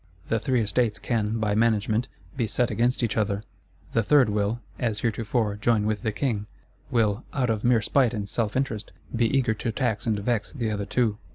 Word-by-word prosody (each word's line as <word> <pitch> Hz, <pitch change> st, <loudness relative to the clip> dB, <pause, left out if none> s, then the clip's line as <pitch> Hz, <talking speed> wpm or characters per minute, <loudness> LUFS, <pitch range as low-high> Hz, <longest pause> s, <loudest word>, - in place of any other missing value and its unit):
The 115 Hz, -, +2 dB
Three 130 Hz, -2 st, +1 dB
Estates 110 Hz, 0 st, +1 dB
can, 110 Hz, -1 st, -1 dB
by 105 Hz, -2 st, 0 dB
management, 110 Hz, +1 st, +2 dB, 0.3 s
be 120 Hz, -5 st, 0 dB
set 120 Hz, +2 st, +1 dB
against 120 Hz, +2 st, +1 dB
each 115 Hz, -, 0 dB
other; 105 Hz, -1 st, 0 dB, 0.5 s
the 115 Hz, -, +3 dB
Third 130 Hz, +1 st, +4 dB
will, 105 Hz, +2 st, 0 dB, 0.2 s
as 110 Hz, -3 st, -1 dB
heretofore, 110 Hz, -2 st, 0 dB
join 105 Hz, 0 st, +2 dB
with 110 Hz, -1 st, 0 dB
the 110 Hz, -, 0 dB
King; 105 Hz, -3 st, -1 dB, 0.4 s
will, 110 Hz, -1 st, +1 dB
out 125 Hz, -4 st, +1 dB
of 110 Hz, -2 st, -2 dB
mere 120 Hz, -2 st, +4 dB
spite 125 Hz, -1 st, +2 dB
and 100 Hz, -2 st, -3 dB
self 110 Hz, +2 st, -1 dB
interest, 115 Hz, -6 st, -2 dB, 0.2 s
be 115 Hz, 0 st, +3 dB
eager 125 Hz, -3 st, +2 dB
to 115 Hz, +1 st, -3 dB
tax 110 Hz, -2 st, -1 dB
and 110 Hz, -2 st, +2 dB
vex 105 Hz, +1 st, -1 dB
the 115 Hz, -6 st, -2 dB
other 100 Hz, -1 st, -3 dB
two. 110 Hz, -2 st, +1 dB
110 Hz, 195 wpm, -26 LUFS, 105-120 Hz, 0.5 s, Third